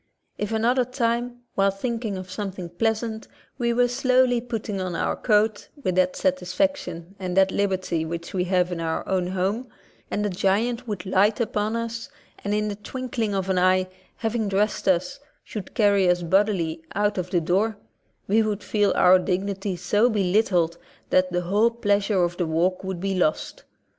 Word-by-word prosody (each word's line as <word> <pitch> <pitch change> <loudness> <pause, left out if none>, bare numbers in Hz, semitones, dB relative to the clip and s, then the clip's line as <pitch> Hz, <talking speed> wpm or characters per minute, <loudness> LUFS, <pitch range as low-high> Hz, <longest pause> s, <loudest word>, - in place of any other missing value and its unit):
If 210 - -3
another 235 +3 +2
time, 245 -1 -2
while 195 0 +3
thinking 220 0 -3
of 185 0 -8
something 185 -2 -5
pleasant, 220 +4 -1 0.3
we 235 -1 +1
were 245 +1 +3
slowly 255 -1 +2
putting 220 -5 -4
on 180 -2 -3
our - - 0
coat 215 -1 +1 0.2
with 185 - +1
that 185 0 +2
satisfaction 185 - -1
and 185 -1 -3
that 190 0 +5
liberty 185 -4 0
which 170 +1 -5
we 180 -1 0
have 180 -1 +1
in 175 - -3
our 165 -1 -2
own 185 -2 0
home, 195 +7 -1 0.4
and 210 - -1
a - - +1
giant 210 +6 +1
should 205 -4 -4
light 195 +3 +3
upon 220 -1 -1
us, 230 0 -4 0.3
and 205 - -2
in 210 0 0
the 205 - -3
twinkling 235 -1 -3
of 190 -1 -1
an 190 -1 +1
eye, 185 0 +3 0.3
having 225 -1 -1
dressed 205 +2 0
us, 180 -1 +1 0.2
should 205 -4 -8
carry 200 -4 +4
us 175 0 +2
bodily 175 -3 +1
out 205 -1 +1
of 180 0 -3
the 180 - +2
door, 195 +6 +1 0.5
we 215 +3 +4
would 210 -2 -2
feel 205 -2 +2
our 185 +1 +6
dignity 195 +1 -2
so 210 +6 +2
belittled 185 -5 +1 0.3
that 185 0 +3
the 180 0 0
whole 205 +6 +3
pleas 205 -3 0
ure 190 -4 +3
of 175 0 -1
the 175 - 0
walk 175 +4 0
would 190 -2 -4
be 195 +2 -1
lost. 175 -4 -1
195 Hz, 180 wpm, -24 LUFS, 185-220 Hz, 0.5 s, our